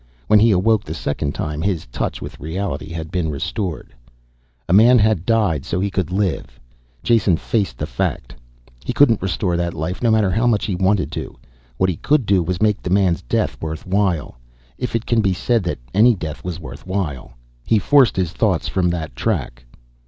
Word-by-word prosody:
When 105 +9 +5
he 115 +2 +5
awoke 105 +2 +3
the 80 - -6
second 70 -2 -3
time, 75 0 -3
his 90 -3 -1
touch - - -4
with - - -9
reality 80 -2 -4
had 80 -1 -6
been 90 -3 -1
restored. 80 - -4 0.7
A 85 - +1
man 115 +5 +7
had 105 -5 +2
died 105 - +2
so 85 - -2
he 100 +1 -1
could 95 -5 -1
live. 90 -10 -2 0.4
Jason 105 -7 +3
faced 100 - -1
the - - -3
fact. - - -3 0.5
He - - -3
couldn't 120 -7 +4
restore 90 -1 -1
that 85 -1 -2
life, 80 +5 -4
no 120 - +2
matter 110 -4 +3
how 115 +6 +1
much 110 -4 +2
he 105 - -2
wanted 95 0 +1
to. - - -6 0.4
What 95 - +2
he 80 - -6
could 150 -5 +1
do 95 -2 +3
was 90 +3 -2
make 105 -1 +2
the - - -4
man's 95 -2 +2
death - - -2
worth 80 0 -5
while. 95 -9 -1 0.4
If 125 -2 -3
it 115 - -1
can 115 -1 +2
be 100 -3 +1
said 115 +5 +1
that 85 - -2 0.2
any 115 +4 +5
death 80 -4 -6
was 90 -2 -5
worth 70 +1 -10
while... 80 -11 -3 0.3
He 110 - +2
forced 130 +3 +4
his 90 -4 -1
thoughts 95 -5 0
from 90 -2 +1
that 80 -7 -4
track. - - -2
95 Hz, 195 wpm, -20 LUFS, 80-105 Hz, 0.7 s, man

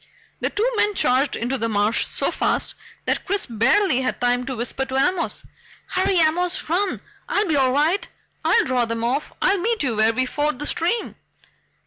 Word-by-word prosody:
The - - -1
two 440 +4 0
men 415 -1 +2
charged 260 -1 +2
into 245 +3 -2
the 230 - -1
marsh 210 +1 +1
so - - -1
fast - - -1 0.3
that - - 0
Chris 400 +1 0
barely 250 - +2
had 255 - -2
time 245 +1 +1
to 260 - -3
whisper 245 +3 -2
to 265 0 -5
Amos: 330 +6 0 0.5
"Hurry 380 +1 +1
Amos 350 +2 +1
run! 380 +2 +1 0.3
I'll 410 0 +1
be 315 - +1
all 265 -2 +3
right. 310 +8 +1 0.4
I'll - - +3
draw 255 -2 +1
them 230 0 -3
off! 265 +5 -1
I'll 395 0 +3
meet 445 +2 0
you 245 -5 0
where 220 +1 +4
we 255 +3 0
ford 295 +1 -1
the 295 - -5
stream!" 350 +10 -1
275 Hz, 185 wpm, -22 LUFS, 245-370 Hz, 0.5 s, where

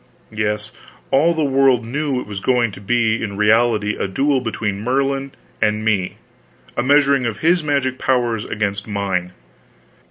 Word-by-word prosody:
Yes, 105 0 -2 0.4
all 165 +5 +3
the 160 - 0
world 135 -4 +3
knew 140 +2 -2
it - - -6
was 100 -1 -6
going 120 +1 +1
to 100 - -11
be 115 +1 +1
in 100 -3 -4
reality 105 0 +2
a - - -2
duel 135 +7 +1
between 105 -4 -3
Merlin 135 +3 -1 0.3
and 105 0 +1
me, 100 -5 0 0.6
a - - 0
measuring 140 -1 +3
of 110 -3 -4
his 170 +1 +3
magic 140 -3 -1
powers 120 -4 0
against 100 -2 -3
mine. 95 -4 -2
115 Hz, 155 wpm, -19 LUFS, 105-135 Hz, 0.6 s, all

